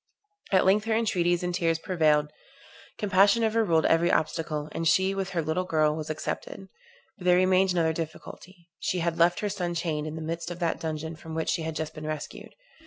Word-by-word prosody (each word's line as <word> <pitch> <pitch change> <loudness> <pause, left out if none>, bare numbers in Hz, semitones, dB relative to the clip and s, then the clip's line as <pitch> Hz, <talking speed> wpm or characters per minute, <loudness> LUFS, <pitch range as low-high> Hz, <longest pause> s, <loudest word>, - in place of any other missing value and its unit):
At 190 -2 +4
length 205 +3 +3
her 225 -1 +1
entreaties 180 -6 +1
and 180 0 -2
tears 165 -2 +1
prevailed; 155 -4 +1 0.7
compassion 200 +3 +3
overruled 215 -8 +2
every 170 +1 +3
obstacle; 155 -1 -1
and 165 - -2
she, 190 +5 +3
with 195 -1 -3
her 175 -4 -1
little 160 +4 -1
girl, 155 -4 +1
was 155 -1 -5
accepted. - - -5 0.5
But 180 - -9
there 180 0 +5
remained 185 0 +3
another 165 -2 +1
difficulty; 170 +2 -8
she 185 - -1
had 170 -1 -1
left 175 +1 +3
her 210 - -1
son 180 -4 -3
chained 155 -3 -2
in 155 - -5
the 160 - -6
midst 170 +1 -4
of 175 - -6
that 170 -2 -1
dungeon 160 0 -4
from 160 0 -9
which 160 - -2
she 170 - 0
had 160 0 -4
just 155 0 -4
been 155 0 -7
rescued. 155 -1 -6
170 Hz, 200 wpm, -27 LUFS, 160-185 Hz, 0.7 s, there